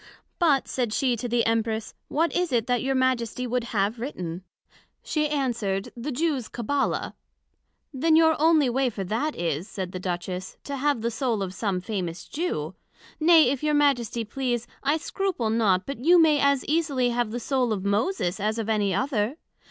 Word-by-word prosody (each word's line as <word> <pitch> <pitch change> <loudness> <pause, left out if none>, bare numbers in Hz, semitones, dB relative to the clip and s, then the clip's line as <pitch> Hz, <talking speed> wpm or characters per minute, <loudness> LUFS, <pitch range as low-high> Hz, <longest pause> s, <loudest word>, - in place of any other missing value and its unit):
But, 300 -6 +3
said 240 -5 -2
she 255 -1 +1
to 240 +2 -4
the 235 0 +2
Empress, 225 -1 -1
What 330 +3 0
is 355 -3 0
it 235 -3 +1
that 245 -1 +1
your 270 0 0
Majesty 250 -2 0
would 245 0 -1
have 215 0 -1
written? 180 - -5 0.6
she 305 -2 0
answered, 235 -9 -1
The 245 +5 -4
Jews 280 -3 -1
Cabbala. 275 +4 -1 0.8
Then 315 +4 +3
your 320 0 +5
onely 315 -3 +5
way 255 +1 +1
for 205 -4 -5
that 230 +11 -2
is, 165 +1 -2
said 185 -2 -5
the 185 - -5
Duchess, 180 0 -4
to 280 -1 -4
have 285 -3 +1
the 235 +1 -1
Soul 235 -3 -1
of 185 -1 -5
some 190 -2 -2
famous 180 -4 -4
Jew; 350 +4 -3 0.5
nay, 320 -4 +6
if 275 - -2
your 300 -1 +1
Majesty 245 -6 +2
please, 240 +1 -2 0.2
I 285 +3 +2
scruple 325 - -2
not, 205 -5 +2
but 275 -3 -6
you 350 +3 +6
may 310 -3 +5
as 280 -1 +2
easily 285 -6 +1
have 240 -1 0
the 240 +3 -4
Soul 250 -1 0
of 200 -2 -2
Moses, 200 - 0
as 215 +2 -1
of 225 -2 -3
any 205 -4 +1
other. 250 +2 0
245 Hz, 185 wpm, -25 LUFS, 215-285 Hz, 0.8 s, nay